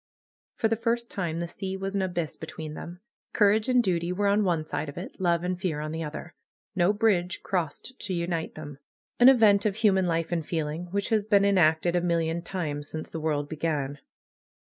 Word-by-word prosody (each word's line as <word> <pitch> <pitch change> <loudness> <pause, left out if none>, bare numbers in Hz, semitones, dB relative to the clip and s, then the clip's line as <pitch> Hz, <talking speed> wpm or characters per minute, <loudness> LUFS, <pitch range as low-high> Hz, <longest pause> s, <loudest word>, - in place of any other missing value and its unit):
For 225 - +1
the 225 - +1
first 235 +1 -1
time 170 -4 -2
the 170 - -2
sea 190 +2 -5
was 195 +1 -4
an 200 - +1
abyss 175 -4 -2
between 160 -1 -7
them. 175 +3 -8 0.3
Courage 215 +2 +3
and 250 -1 +4
duty 175 -3 0
were 200 +3 -1
on 200 +1 +3
one 170 -5 0
side 155 - -3
of 145 - -10
it; 185 +2 -8
love 170 -2 +2
and 180 0 -2
fear 165 -6 -1
on 155 0 -4
the 160 +1 -3
other. 155 +3 -7 0.4
No 180 +1 +4
bridge 205 -5 +1
crossed 185 - -3
to 195 - -3
unite 170 -1 -2
them. 145 -3 -9 0.4
An 245 +2 +9
event 215 -6 +5
of 210 -3 0
human 195 -4 +3
life 165 0 -1
and 170 -2 0
feeling, 160 +1 -3
which 200 +4 -2
has 220 -3 +2
been 200 -1 +4
enacted 175 -3 +3
a 175 - +2
million 170 -1 0
times 150 -6 -4
since 155 0 -6
the 165 - -4
world 150 -2 -1
began. 150 -3 -2
175 Hz, 205 wpm, -27 LUFS, 160-200 Hz, 0.4 s, An